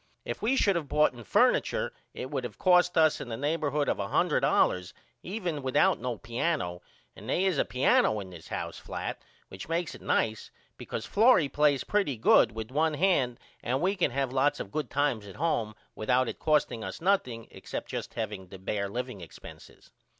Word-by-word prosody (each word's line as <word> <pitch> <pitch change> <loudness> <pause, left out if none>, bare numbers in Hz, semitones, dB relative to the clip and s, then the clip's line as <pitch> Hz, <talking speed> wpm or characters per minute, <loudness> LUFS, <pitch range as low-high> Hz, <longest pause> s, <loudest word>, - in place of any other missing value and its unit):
If 120 - -5
we 235 +6 +2
should 200 -7 +3
of 165 -4 -2
boughten 145 -5 +1
furniture - - +2 0.2
it 130 - -6
would 130 -4 -4
cost 180 -1 +4
us 155 -1 +4
in 120 - -7
the 115 - -3
neighborhod 145 0 0
of - - +1
$100 90 -2 +1 0.3
even 180 -7 -4
without 130 -1 +2
no 125 -1 -3
piano 115 - -2 0.3
and - - -10
they 185 - +1
is 180 -7 +1
a - - +2
piano 125 -4 +3
in 95 -2 -8
this 85 -3 -11
here - - -4
flat - - -6 0.3
which 95 +10 -9
makes 165 0 -1
it - - -12
nice 110 -1 0 0.3
because - - -6
Florrie 210 - +4
plays 145 -3 +2
pretty 195 - 0
good 110 0 +5
with 110 +1 -6
one 155 +2 +1
hand 145 -9 +2 0.2
and 125 +3 -1
we 190 +5 +1
can 180 - +1
have 135 0 -2
lots 135 +2 +2
of 95 - -6
good 155 -1 -3
times 135 -7 0
at 95 - -10
home 120 -9 -1 0.2
without 125 +3 +1
it - - -5
costing 150 -7 +1
us - - -6
nothing 130 - 0
except - - -7
just - - -6
the 100 -4 -5
bear 100 +1 -2
liveing 125 -2 -5
expenses. 85 - -13
130 Hz, 180 wpm, -29 LUFS, 110-160 Hz, 0.3 s, good